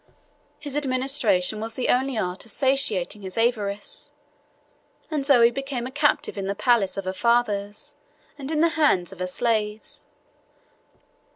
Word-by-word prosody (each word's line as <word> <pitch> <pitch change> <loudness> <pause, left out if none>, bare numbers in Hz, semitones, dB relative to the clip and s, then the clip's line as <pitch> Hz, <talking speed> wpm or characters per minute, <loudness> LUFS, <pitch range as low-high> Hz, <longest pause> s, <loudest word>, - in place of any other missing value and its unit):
His 290 -2 -7
administration 255 -8 +1
was 225 0 -6
only 260 +1 +1
the - - 0
art 180 -2 -3
of 230 - -12
satiating 220 -6 +1
his 190 +1 -7
avarice, 210 -1 -1 1.0
and 300 -3 -1
Zoe 245 -4 +5
became 270 -1 -4
a 255 - -5
captive 290 -7 +1
in 195 - -3
the 200 - -1
palace 210 -3 +2
of 195 - -3
her 185 - -2
fathers, 235 +4 0 0.4
and 280 -1 -7
in 310 -1 +1
the 335 - +5
hands 295 - +2
of 190 - -12
her 185 - -2
slaves. 215 +1 -1
235 Hz, 150 wpm, -24 LUFS, 200-275 Hz, 1.0 s, Zoe